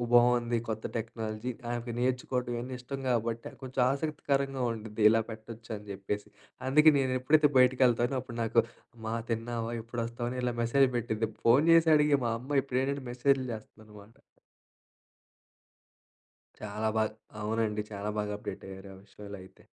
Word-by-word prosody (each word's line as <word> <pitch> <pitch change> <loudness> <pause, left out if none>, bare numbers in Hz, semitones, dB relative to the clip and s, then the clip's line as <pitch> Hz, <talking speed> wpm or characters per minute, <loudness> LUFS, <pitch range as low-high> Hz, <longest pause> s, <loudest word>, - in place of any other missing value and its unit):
బాగుంది. 120 0 +4
కొత్త 110 0 -3
టెక్నాలజీ 110 +1 -4 0.2
ఆమెకు 120 0 -4
నేర్చుకోవడం 125 0 -1
ఇవన్నీ 125 +2 -4
ఇష్టం 135 +2 -6
కాబట్టి, 115 -1 -1
కొంచెం 130 0 -2
ఆసక్తికరంగా 140 -2 -1
ఉంటది. 110 -1 -6
ఇలా 115 0 +3
పెట్టొచ్చని 110 -1 -8
చెప్పేసి. 100 +1 -4 0.4
అందుకే 150 +3 +7
నేను 130 -1 +1
ఎప్పుడైతే 150 +3 +4
బయటికి 125 +1 +4
వెళ్తానో, 120 +2 +1
అప్పుడు 120 -2 -8
నాకు 115 +1 +3 0.4
అమ్మా 110 -1 -5 0.2
తిన్నావా? 115 0 -2
ఎప్పుడొస్తావని 120 +1 -4
ఇలా 120 -1 0
మెసేజ్లు 130 +3 +3
పెట్టిద్ది. 110 -1 -1 0.2
ఫోన్ 125 +6 +6
చేసడిగే 150 -3 +5
మా 115 - +1
అమ్మ 135 +3 +1
ఇప్పుడేంటంటే 135 +1 -1
మెసేజ్లు 130 +2 +2
చేస్తదనమాట. 110 0 -11 2.8
చాలా 105 +1 -2
బాగా. 110 0 +1 0.3
అవునండి. 105 -1 0
చాలా 100 0 -4
బాగా 105 0 -2
అప్డేట్ 100 -1 -7
అయ్యారు. 95 +1 -9
ఆ - - -13
విషయాల్లో 100 0 -10
అయితే. 95 - -18
120 Hz, 135 wpm, -30 LUFS, 110-130 Hz, 2.8 s, అందుకే